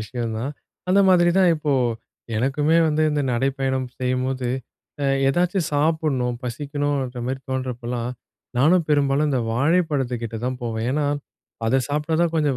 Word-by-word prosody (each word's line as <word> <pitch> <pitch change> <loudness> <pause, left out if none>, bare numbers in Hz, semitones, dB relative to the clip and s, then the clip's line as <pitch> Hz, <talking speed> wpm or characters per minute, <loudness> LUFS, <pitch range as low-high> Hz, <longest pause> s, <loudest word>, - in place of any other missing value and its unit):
விஷயம் 115 +1 -4
தான். 135 +6 -3 0.4
அந்த 195 +2 +5
மாதிரி 175 -2 +5
தான் 185 -2 +5
இப்போ, 150 -2 -1 0.6
எனக்குமே 145 +7 +2
வந்து 155 +1 +1
இந்த 145 -1 0
நடைப்பயணம் 130 0 0
செய்யும்போது, 130 0 -1 0.5
அ - - +1 0.2
எதாச்சும் 175 +3 +1
சாப்பிடணும், 145 -5 +1
பசிக்கணுன்ற 140 -1 -2
மாரி 130 +1 -3
தோணுறப்பலாம், 125 -2 -3 0.5
நானும் 165 +5 +4
பெரும்பாலும் 145 0 +2
இந்த 130 -3 +1
வாழைப்பழத்துக்கிட்ட 135 -6 0
தான் 130 -1 -2
போவேன். 115 -1 -2
ஏன்னா, 145 +1 0 0.6
அத 130 +4 +3
சாப்ட்டா 150 +2 -1
தான் 170 -1 +1
கொஞ்சம் 145 -5 +1
135 Hz, 135 wpm, -23 LUFS, 125-150 Hz, 0.6 s, அந்த